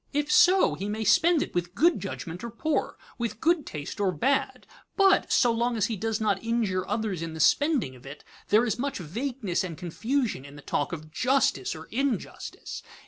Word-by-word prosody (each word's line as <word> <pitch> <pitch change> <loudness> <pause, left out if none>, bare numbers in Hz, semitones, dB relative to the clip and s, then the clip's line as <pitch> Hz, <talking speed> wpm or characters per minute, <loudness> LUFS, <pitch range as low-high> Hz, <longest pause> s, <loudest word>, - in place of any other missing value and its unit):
If 295 +1 0
so, 370 +1 +5
he 200 +2 -4
may 220 +1 -2
spend 305 - +4
it - - -9
with 175 +1 -2
good 340 +8 +3
judgment 180 -2 -6
or 235 - -4
poor, 310 +7 -2 0.2
with 235 -2 -3
good 335 +1 +2
taste 150 +3 -6
or 200 -2 +2
bad, 265 - 0 0.3
but, 390 -1 +4
so 245 - +4
long 235 +1 0
as 210 - +2
he - - -1
does 220 +2 -2
not 205 -3 0
injure 225 -5 0
others 210 -5 -2
in 165 -1 -5
the - - -7
spending 275 - +2
of 125 - -16
it, 140 +2 -10 0.2
there 220 +3 +4
is 225 0 -2
much 280 +1 -2
vagueness 210 - -3
and 170 -4 -6
confusion 220 - -2
in 140 0 -12
the 145 - -12
talk 145 - -1
of 155 -2 -7
"justice" 255 - +1
or 160 0 -9
"injustice." 270 +1 -3
220 Hz, 195 wpm, -27 LUFS, 175-270 Hz, 0.3 s, so